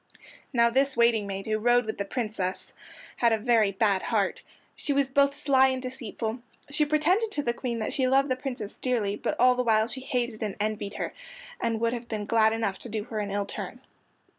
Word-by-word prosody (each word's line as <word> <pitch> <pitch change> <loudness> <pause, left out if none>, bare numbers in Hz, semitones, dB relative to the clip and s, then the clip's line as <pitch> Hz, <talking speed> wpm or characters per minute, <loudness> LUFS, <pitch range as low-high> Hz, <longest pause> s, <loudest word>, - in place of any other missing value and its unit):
Now 235 -3 +4
this 270 +1 +2
waiting 235 -3 +3
maid, 195 0 -5
who 215 0 0
rode 240 +2 +3
with 220 - -5
the 200 - -1
Princess, 210 -5 -3 0.4
had 235 -1 +3
a 225 - +3
very 220 -2 +3
bad 200 -1 +2
heart. - - 0 0.3
She 285 - -2
was 275 -1 +1
both 280 +1 +3
sly 265 -2 +4
and 260 -1 -1
deceitful. 250 -3 -5 0.3
She 300 +1 +2
pretended 345 +9 +2
to 290 - -1
the 235 - 0
Queen 235 -1 -3
that 220 - -2
she 260 -2 +1
loved 270 +2 +3
the 255 - +2
Princess 250 -5 -5
dearly, 225 -6 0
but - - -3
all 250 +1 +6
the 250 - 0
while 220 -2 +3
she 260 +2 -5
hated 245 -3 -2
and 210 -3 -2
envied 210 -1 -2
her, - - -4 0.5
and 225 -1 0
would 230 0 +1
have 240 -1 -5
been 215 -3 -3
glad 220 0 +4
enough 220 -4 -2
to 240 - -9
do 215 -1 -3
her 220 -1 -5
an 205 -1 -2
ill 200 0 -1
turn. - - -6
235 Hz, 215 wpm, -27 LUFS, 215-260 Hz, 0.5 s, all